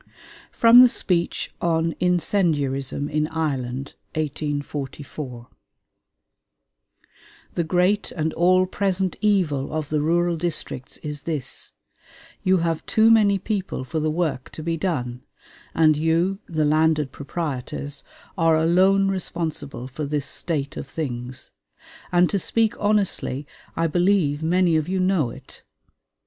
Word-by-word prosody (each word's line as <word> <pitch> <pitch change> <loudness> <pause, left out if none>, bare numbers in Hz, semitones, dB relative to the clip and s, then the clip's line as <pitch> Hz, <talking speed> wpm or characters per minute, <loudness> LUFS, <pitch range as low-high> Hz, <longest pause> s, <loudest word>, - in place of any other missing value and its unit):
FROM 235 +1 +8
THE 255 - +9
SPEECH 175 -7 -1
ON 165 -1 +1
INCENDIARISM 150 -7 +1
IN 150 +1 0
IRELAND 135 -5 -3 0.2
(1844) 145 -4 -4 2.1
The 170 - 0
great 180 +5 +1
and 160 -1 -1
all 185 +2 +4
present 190 -1 -1
evil 180 -10 +1
of 155 -2 -3
the 150 -1 0
rural 170 +2 +1
districts 155 -6 -3
is 150 -1 -4
this 150 -5 -5 0.7
you 190 -1 +3
have 165 -1 -1
too 220 +1 +4
many 205 -3 +5
people 195 - -3
for 130 +5 -3
the 155 0 0
work 155 -5 -2
to 155 - -7
be 165 +1 -1
done, 130 -9 -2 0.5
and 155 -1 +5
you, 165 +5 +1
the 155 -3 0
landed 155 -2 +2
proprietors, 145 -2 -5 0.3
are 165 -1 +3
alone 190 +4 +4
responsible 160 -9 -3
for 140 +3 -5
this 145 -1 -2
state 145 -5 -3
of - - -5
things; 130 -4 -5 0.6
and 175 0 +4
to 200 - +1
speak 225 +4 +1
honestly, 200 -9 0 0.3
I 165 - +1
believe 175 -3 +2
many 170 0 +3
of 155 +2 -2
you 190 0 0
know 185 -8 +2
it. - - -12
160 Hz, 125 wpm, -23 LUFS, 145-185 Hz, 2.1 s, THE